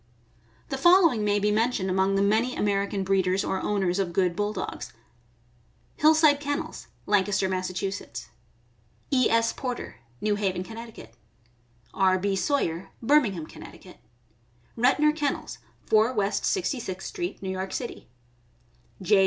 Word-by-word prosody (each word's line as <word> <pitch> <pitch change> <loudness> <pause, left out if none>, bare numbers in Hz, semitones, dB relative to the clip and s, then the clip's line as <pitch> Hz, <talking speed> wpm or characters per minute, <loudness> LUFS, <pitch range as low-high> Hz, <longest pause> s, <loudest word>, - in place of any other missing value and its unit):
The 270 - -3
following 335 - +5
may 205 0 +2
be 205 +1 +1
mentioned 220 -2 +1
among 190 +1 +1
the 195 - +2
many 220 +5 +1
Amer 200 -1 +1
ican 200 -1 -3
breeders 190 0 +1
or 190 - -2
owners 195 -3 0
of 180 -3 -1
good 180 -1 +1
Bulldogs: 205 -1 -4 1.0
Hillside 310 -1 +5
Ken 290 0 -1
nels, - - -8 0.2
Lancaster, 200 -1 +2
Mass.; 185 -1 -2 1.4
E. 255 -3 +3
S. 230 0 +2
Porter, 250 - -5 0.2
New 215 - +1
Haven, 190 -3 -1
Conn.; 225 +3 -9 1.0
R. 190 -1 +3
B. 195 +1 -1
Sawyer, 190 - -1
Birmingham, 225 - +2
Conn.; - - -13 0.8
Retnor 295 +6 +3
Kennels, 290 -3 -3 0.3
4 220 +3 +3
West 205 -3 0
Sixty 355 -9 0
sixth 190 -4 -6
street, 355 -4 -5
New 190 - -2
York 190 0 -4
City; 240 - -5 1.0
J. 200 +2 +4
205 Hz, 135 wpm, -26 LUFS, 190-255 Hz, 1.4 s, following